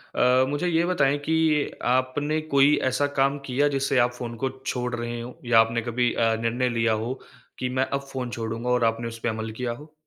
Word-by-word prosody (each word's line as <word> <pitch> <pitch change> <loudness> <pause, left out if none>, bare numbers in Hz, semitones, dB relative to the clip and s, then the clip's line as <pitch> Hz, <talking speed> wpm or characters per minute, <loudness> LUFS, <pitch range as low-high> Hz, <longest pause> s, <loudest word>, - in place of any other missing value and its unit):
अ, 130 +1 +4
मुझे 145 +5 -1
ये 170 0 +2
बताएँ 145 -6 +2
कि 160 -2 +2 0.2
आपने 135 +4 0
कोई 140 +2 +6 0.2
ऐसा 145 +3 +1
काम 140 +1 +3
किया 135 +3 +1
जिससे 135 0 +1
आप 120 0 +3
फ़ोन 120 -1 -6
को 135 - +2 0.2
छोड़ 125 -1 -2
रहे 120 0 -4
हों 120 +1 -8 0.2
या 115 -2 +6
आपने 115 +1 +2
कभी 120 +1 0
अ, 115 -1 +2
निर्णय 120 +2 0
लिया 115 -1 +1
हो, 110 +4 -2 0.5
कि 125 - -1
मैं 130 +1 +1
अब 140 - +1
फ़ोन 130 -2 -4
छोड़ूँगा 115 +1 -4
और 125 -1 +2
आपने 115 +1 0
उसपे 115 +1 -3
अमल 110 0 -4
किया 120 +2 -3
हो? 150 +6 -10
125 Hz, 210 wpm, -25 LUFS, 115-140 Hz, 0.5 s, कोई